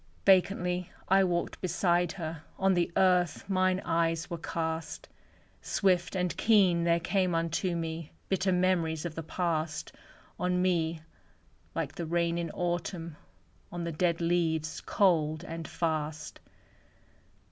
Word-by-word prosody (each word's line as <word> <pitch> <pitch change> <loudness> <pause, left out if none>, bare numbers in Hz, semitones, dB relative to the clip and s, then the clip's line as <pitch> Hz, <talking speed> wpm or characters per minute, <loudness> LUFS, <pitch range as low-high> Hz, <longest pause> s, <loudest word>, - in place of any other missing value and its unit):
Vacantly 180 -2 +3 0.2
I 195 +1 +6
walked 175 -2 -1
beside 175 -1 +1
her. 160 -3 -5 0.2
On 190 0 +3
the 175 -1 +1
earth 180 -2 +2
mine 185 -1 +2
eyes 165 +1 0
were 170 - -3
cast; 160 0 -4 0.5
Swift 180 -2 +1
and 180 -1 0
keen 190 -6 +4
there 170 0 +3
came 185 0 +1
unto 165 +2 0
me 165 -1 -4 0.2
Ritter 190 0 +2
memories 175 -3 +1
of 170 - -3
the 165 - -5
past 160 -2 -2 0.5
On 180 0 +1
me, 170 -3 +1 0.7
like - - -2
the 170 - -5
rain 170 0 +1
in 170 -1 -3
Autumn 175 -1 -3 0.6
On 175 -1 -4
the 170 - -2
dead 170 +1 +1
leaves, 165 -2 0
cold 160 -5 +2
and 165 -2 -6
fast. 155 -2 -3
170 Hz, 130 wpm, -30 LUFS, 165-180 Hz, 0.7 s, I